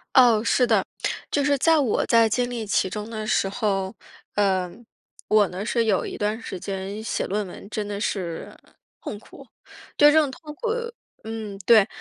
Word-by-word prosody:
哦， 235 Hz, -4 st, +6 dB
是 245 Hz, +1 st, +3 dB
的， -, -, +3 dB, 0.5 s
就 285 Hz, -, +2 dB
是 285 Hz, 0 st, +2 dB
在 325 Hz, +3 st, +4 dB
我 255 Hz, -7 st, +1 dB
在 230 Hz, -1 st, +4 dB
经 245 Hz, +3 st, +1 dB
历 235 Hz, -3 st, -5 dB
其 195 Hz, -, +2 dB
中 210 Hz, +3 st, -5 dB
的 215 Hz, -1 st, -5 dB
时 195 Hz, -2 st, +1 dB
候， 195 Hz, -1 st, -1 dB, 0.4 s
呃， 190 Hz, -3 st, +1 dB, 0.6 s
我 210 Hz, -2 st, +4 dB
呢 185 Hz, +3 st, -5 dB
是 230 Hz, +1 st, +1 dB
有 205 Hz, -4 st, +1 dB
一 -, -, -5 dB
段 210 Hz, +2 st, -1 dB
时 190 Hz, -5 st, -7 dB
间 195 Hz, +2 st, -5 dB
写 -, -, -2 dB
论 205 Hz, +1 st, -2 dB
文 185 Hz, -, -10 dB
真 210 Hz, -1 st, -3 dB
的 205 Hz, -1 st, -4 dB
是 180 Hz, -5 st, -3 dB, 0.5 s
痛 210 Hz, -, -5 dB
苦。 205 Hz, -, -15 dB, 0.5 s
对 295 Hz, 0 st, +8 dB
这 315 Hz, +1 st, +6 dB
种 295 Hz, -, 0 dB
痛 300 Hz, +2 st, -10 dB
苦 465 Hz, -, -3 dB, 0.5 s
嗯， 220 Hz, -2 st, -6 dB
对， 220 Hz, -2 st, +6 dB
215 Hz, 195 characters per minute, -24 LUFS, 200-240 Hz, 0.6 s, 对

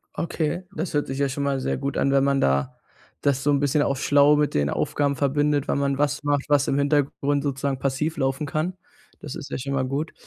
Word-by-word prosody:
Okay. 165 Hz, +1 st, -2 dB
Das 160 Hz, +3 st, -3 dB
hört 145 Hz, -1 st, 0 dB
sich 135 Hz, +1 st, -4 dB
ja 140 Hz, -1 st, +1 dB
schon 140 Hz, +1 st, -3 dB
mal 140 Hz, -1 st, 0 dB
sehr 130 Hz, -, -1 dB
gut 140 Hz, +1 st, -3 dB
an, 140 Hz, -, +2 dB
wenn 135 Hz, 0 st, +3 dB
man 140 Hz, 0 st, +2 dB
da 70 Hz, 0 st, +1 dB, 0.5 s
das 140 Hz, -1 st, +1 dB
so 145 Hz, -, +3 dB
'n 140 Hz, -, +3 dB
bisschen 145 Hz, +1 st, +2 dB
auf 140 Hz, -2 st, -1 dB
schlau 145 Hz, +1 st, +5 dB
mit 150 Hz, 0 st, +1 dB
den 70 Hz, -1 st, +1 dB
Aufgaben 140 Hz, -, 0 dB
verbindet, 145 Hz, +1 st, +1 dB
wann -, -, 0 dB
man 140 Hz, -1 st, 0 dB
was 145 Hz, +1 st, 0 dB
macht, 145 Hz, -1 st, 0 dB
was 145 Hz, -1 st, +3 dB
im 135 Hz, -, +1 dB
Hintergrund 145 Hz, 0 st, +1 dB
sozusagen 140 Hz, -1 st, -2 dB
passiv 140 Hz, +4 st, -1 dB
laufen 135 Hz, +2 st, -1 dB
kann. 155 Hz, +5 st, -2 dB, 0.5 s
Das -, -, -7 dB
ist -, -, -8 dB
ja -, -, -3 dB
schon 135 Hz, +1 st, -4 dB
mal 130 Hz, -1 st, 0 dB
gut. 145 Hz, +4 st, -3 dB
140 Hz, 235 wpm, -24 LUFS, 135-145 Hz, 0.5 s, schlau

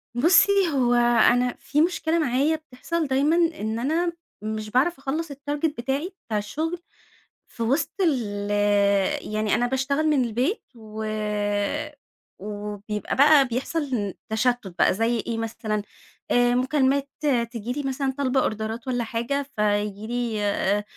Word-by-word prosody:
بُصّي، 340 Hz, +9 st, +5 dB, 0.2 s
هو 245 Hz, -3 st, +2 dB
أنا 240 Hz, +1 st, +4 dB
في 295 Hz, -, 0 dB
مشكلة 335 Hz, -1 st, +1 dB
معايا 290 Hz, +2 st, +2 dB
بتحصل 310 Hz, +2 st, -4 dB
دايمًا 275 Hz, +4 st, +2 dB
إن 315 Hz, -11 st, 0 dB
أنا 330 Hz, +7 st, 0 dB, 0.3 s
مش 215 Hz, 0 st, -4 dB
باعرف 265 Hz, +10 st, +2 dB
أخلص 295 Hz, +3 st, -3 dB
الtarget 290 Hz, +3 st, -2 dB
بتاعي 275 Hz, +9 st, -2 dB, 0.2 s
بتاع 215 Hz, -, -1 dB
الشغل 315 Hz, +12 st, -3 dB, 0.7 s
في 230 Hz, -, -5 dB
وسط 265 Hz, +8 st, +1 dB
ال 210 Hz, -, 0 dB, 0.8 s
يعني 215 Hz, -1 st, +1 dB
أنا 245 Hz, -, +1 dB
باشتغل 270 Hz, +4 st, 0 dB
من 290 Hz, -4 st, +3 dB
البيت، 245 Hz, -, -1 dB
و 220 Hz, -1 st, -7 dB, 1.3 s
وبيبقى 210 Hz, +1 st, -5 dB
بقى 285 Hz, 0 st, +6 dB
بيحصل 250 Hz, -, -2 dB, 0.2 s
تشتت 240 Hz, 0 st, 0 dB
بقى -, -, +5 dB
زي 225 Hz, +4 st, +1 dB
إيه 230 Hz, 0 st, -3 dB
مثلًا؟ 220 Hz, -1 st, -2 dB, 0.5 s
آآ، 245 Hz, 0 st, +4 dB
مكالمات 270 Hz, +1 st, +1 dB, 0.4 s
تيجي 235 Hz, -1 st, -5 dB
لي 290 Hz, +2 st, -4 dB
مثلًا 270 Hz, 0 st, -1 dB
طالبة 270 Hz, -1 st, +1 dB
أوردرات 220 Hz, +3 st, -3 dB
والّا 245 Hz, -2 st, 0 dB
حاجة، 235 Hz, +5 st, -2 dB
فييجي 210 Hz, 0 st, 0 dB
لي 235 Hz, -2 st, -2 dB
آآ، 205 Hz, 0 st, +1 dB
250 Hz, 130 wpm, -24 LUFS, 220-285 Hz, 1.3 s, بقى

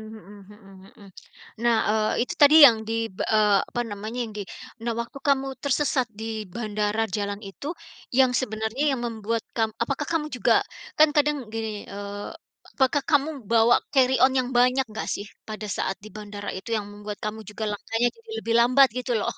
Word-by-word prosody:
mhm 205 Hz, -1 st, -13 dB
mhm 205 Hz, -2 st, -16 dB, 0.2 s
mhm, 200 Hz, -, -14 dB, 0.5 s
nah, 235 Hz, -1 st, +3 dB
eee, 215 Hz, +2 st, +1 dB
itu -, -, -5 dB
tadi 290 Hz, +1 st, +8 dB
yang 235 Hz, -5 st, +6 dB
di, 225 Hz, -, -2 dB, 0.2 s
eee, 210 Hz, 0 st, +3 dB
apa 240 Hz, -, -2 dB
namanya 215 Hz, +4 st, -6 dB
yang 220 Hz, -, -10 dB
di -, -, -3 dB, 0.4 s
nah 235 Hz, 0 st, -1 dB
waktu 235 Hz, +4 st, -9 dB
kamu 270 Hz, -1 st, +2 dB
tersesat 280 Hz, -2 st, +1 dB
di -, -, -4 dB, 0.3 s
bandara 215 Hz, -1 st, -1 dB
jalan 200 Hz, 0 st, -2 dB
itu, 195 Hz, +8 st, -8 dB, 0.5 s
yang 260 Hz, -2 st, +5 dB
sebenarnya 220 Hz, +2 st, -3 dB
yang 255 Hz, -, -3 dB
membuat 225 Hz, 0 st, -3 dB
kam 225 Hz, -1 st, +1 dB
apakah 275 Hz, +4 st, -3 dB
kamu 310 Hz, -2 st, 0 dB
juga 250 Hz, -, +3 dB, 0.4 s
kan 310 Hz, 0 st, +7 dB
kadang 295 Hz, 0 st, +2 dB, 0.2 s
gini, 225 Hz, -1 st, -3 dB, 0.2 s
eee, 205 Hz, 0 st, -7 dB, 0.4 s
apakah 265 Hz, +1 st, +2 dB
kamu 290 Hz, 0 st, +3 dB, 0.2 s
bawa 230 Hz, +1 st, +5 dB, 0.2 s
carry 260 Hz, -1 st, +4 dB
on 260 Hz, 0 st, +5 dB
yang 250 Hz, -1 st, -1 dB
banyak 250 Hz, +2 st, +4 dB
enggak 215 Hz, -, -5 dB
sih 200 Hz, -, -6 dB, 0.2 s
pada 215 Hz, 0 st, -5 dB
saat 190 Hz, -, -1 dB
di 215 Hz, -, -11 dB
bandara 205 Hz, -1 st, -7 dB
itu 190 Hz, -, -9 dB
yang 205 Hz, -, -4 dB
membuat 205 Hz, 0 st, -7 dB
kamu 215 Hz, +1 st, -4 dB
juga 210 Hz, +1 st, -6 dB
langkanya 225 Hz, +3 st, 0 dB
jadi 460 Hz, 0 st, -20 dB
lebih 230 Hz, -, -1 dB
lambat 255 Hz, +3 st, +6 dB
gitu 250 Hz, 0 st, -3 dB
loh? -, -, -1 dB
225 Hz, 180 wpm, -25 LUFS, 210-260 Hz, 0.5 s, tadi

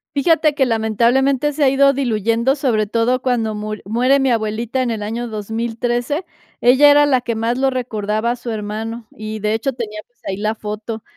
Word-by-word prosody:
Fíjate 305 Hz, +1 st, +3 dB
que, 270 Hz, -, +3 dB
lamentablemente, 245 Hz, +5 st, +1 dB
se 295 Hz, +1 st, 0 dB
ha 270 Hz, -, +5 dB
ido 275 Hz, +1 st, +4 dB
diluyendo, 235 Hz, 0 st, +1 dB
sobre 230 Hz, -7 st, 0 dB
todo 235 Hz, +3 st, +1 dB
cuando 235 Hz, -4 st, 0 dB
mur 215 Hz, 0 st, -5 dB
muere 250 Hz, +6 st, +2 dB
mi 270 Hz, -1 st, +2 dB
abuelita 225 Hz, +3 st, -1 dB
en 250 Hz, -, 0 dB
el 220 Hz, -2 st, -3 dB
año 230 Hz, +3 st, -3 dB
2013. 235 Hz, -, -2 dB, 0.4 s
Ella 260 Hz, +4 st, +6 dB
era 290 Hz, 0 st, +6 dB
la 260 Hz, -4 st, +2 dB
que 235 Hz, -2 st, -3 dB
más 230 Hz, +3 st, -1 dB
lo 270 Hz, -, +3 dB
recordaba 220 Hz, -3 st, -2 dB
a 245 Hz, -, -1 dB
su 240 Hz, 0 st, -8 dB
hermano 220 Hz, +2 st, -5 dB
y, 215 Hz, 0 st, -6 dB
de 210 Hz, +1 st, 0 dB
hecho, 230 Hz, +5 st, -1 dB
tenía, 215 Hz, -3 st, -6 dB
pues, 245 Hz, -1 st, -44 dB
ahí 190 Hz, 0 st, -2 dB
la 215 Hz, +1 st, -1 dB
foto 215 Hz, +1 st, -6 dB
235 Hz, 195 wpm, -19 LUFS, 215-265 Hz, 0.4 s, Ella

